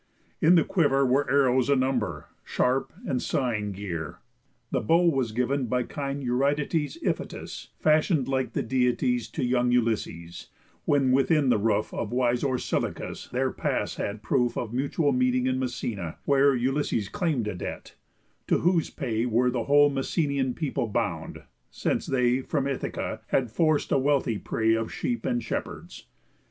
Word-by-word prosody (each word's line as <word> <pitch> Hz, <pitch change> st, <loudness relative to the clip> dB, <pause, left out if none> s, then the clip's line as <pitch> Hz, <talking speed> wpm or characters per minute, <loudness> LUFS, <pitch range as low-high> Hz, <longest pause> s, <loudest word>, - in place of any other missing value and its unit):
In 170 Hz, +3 st, +6 dB
the 165 Hz, -, +5 dB
quiver 145 Hz, -7 st, +2 dB
were 135 Hz, +3 st, +2 dB
Arrows 130 Hz, -2 st, +3 dB
a 140 Hz, -, +5 dB
number, 125 Hz, -, -1 dB
sharp 130 Hz, +2 st, 0 dB
and 130 Hz, -, -1 dB
sighing 110 Hz, -6 st, -1 dB
gear. 90 Hz, -6 st, -5 dB, 0.5 s
The -, -, 0 dB
bow 165 Hz, +10 st, +3 dB
was 135 Hz, -8 st, +1 dB
giv'n 125 Hz, +2 st, -1 dB
by 125 Hz, +1 st, +1 dB
kind 140 Hz, +1 st, -4 dB
Eurytides 145 Hz, -, 0 dB
Iphitus, -, -, -4 dB
fashion'd 155 Hz, -2 st, +2 dB
like 130 Hz, -3 st, -1 dB
the -, -, -1 dB
Deities, 125 Hz, -1 st, +1 dB
To 115 Hz, -, -2 dB
young 125 Hz, 0 st, +2 dB
Ulysses, 110 Hz, -8 st, -1 dB, 0.4 s
when 135 Hz, -3 st, +3 dB
within 140 Hz, +1 st, +3 dB
the 115 Hz, -, +3 dB
roof 105 Hz, 0 st, 0 dB
Of 110 Hz, -, -3 dB
wise 125 Hz, -1 st, +1 dB
Orsilochus 130 Hz, -3 st, -2 dB
their -, -, 0 dB
pass -, -, -2 dB
had 105 Hz, +1 st, -4 dB
proof 125 Hz, -1 st, +1 dB
Of 115 Hz, -1 st, -3 dB
mutual 140 Hz, +3 st, +1 dB
meeting 125 Hz, -1 st, +2 dB
in 130 Hz, 0 st, 0 dB
Messena; 115 Hz, -9 st, -4 dB
where 140 Hz, -1 st, +4 dB
Ulysses 125 Hz, -4 st, 0 dB
claim'd 140 Hz, -, -1 dB
a 105 Hz, -, -2 dB
debt, 90 Hz, -, -7 dB, 0.5 s
to -, -, +3 dB
whose 175 Hz, -2 st, +2 dB
pay 120 Hz, -4 st, -2 dB
were 125 Hz, +2 st, +2 dB
The 120 Hz, -2 st, -2 dB
whole 145 Hz, 0 st, +5 dB
Messenian 140 Hz, -1 st, -1 dB
people 145 Hz, -6 st, -2 dB
bound, 105 Hz, -, -3 dB, 0.3 s
since -, -, -2 dB
they 125 Hz, -1 st, +2 dB
From 140 Hz, +1 st, -1 dB
Ithaca 140 Hz, -2 st, -3 dB
had 125 Hz, -5 st, 0 dB
forc'd 155 Hz, +3 st, +1 dB
a -, -, +4 dB
wealthy 135 Hz, -6 st, +1 dB
prey 110 Hz, 0 st, +1 dB
Of 115 Hz, 0 st, -1 dB
sheep 240 Hz, -1 st, -2 dB
and 245 Hz, -1 st, 0 dB
shepherds. -, -, -6 dB
130 Hz, 155 wpm, -26 LUFS, 120-140 Hz, 0.5 s, In